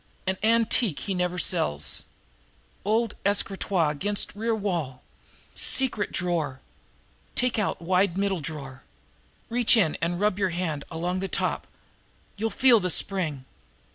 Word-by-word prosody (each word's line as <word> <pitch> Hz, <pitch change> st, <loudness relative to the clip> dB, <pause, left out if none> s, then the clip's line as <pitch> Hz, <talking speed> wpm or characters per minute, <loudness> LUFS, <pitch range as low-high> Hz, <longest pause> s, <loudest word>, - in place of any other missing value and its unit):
"An 190 Hz, 0 st, 0 dB
antique 225 Hz, -, +3 dB
he 195 Hz, -, -2 dB
never 180 Hz, -1 st, -1 dB
sells 75 Hz, -, +1 dB, 0.8 s
old 220 Hz, +2 st, +1 dB
escritoire 195 Hz, -4 st, +1 dB
against 205 Hz, +8 st, -2 dB
rear 225 Hz, +2 st, 0 dB
wall 170 Hz, -11 st, -3 dB, 0.5 s
secret 250 Hz, -6 st, 0 dB
drawer 165 Hz, -7 st, -1 dB, 0.8 s
take 250 Hz, -3 st, +1 dB
out 210 Hz, -, -1 dB
wide 185 Hz, +1 st, +2 dB
middle 195 Hz, -2 st, +1 dB
drawer 135 Hz, -3 st, -7 dB, 0.7 s
reach 240 Hz, 0 st, +4 dB
in 170 Hz, -8 st, +3 dB
and 175 Hz, +1 st, -1 dB
rub 205 Hz, -1 st, +1 dB
your 190 Hz, -2 st, +2 dB
hand 170 Hz, -5 st, -3 dB
along 175 Hz, +3 st, -2 dB
the 195 Hz, -, -2 dB
top -, -, -2 dB, 0.7 s
you'll 225 Hz, +2 st, -1 dB
feel 245 Hz, -1 st, +5 dB
the 180 Hz, -2 st, -1 dB
spring. 160 Hz, -8 st, 0 dB
185 Hz, 130 wpm, -26 LUFS, 165-210 Hz, 0.8 s, feel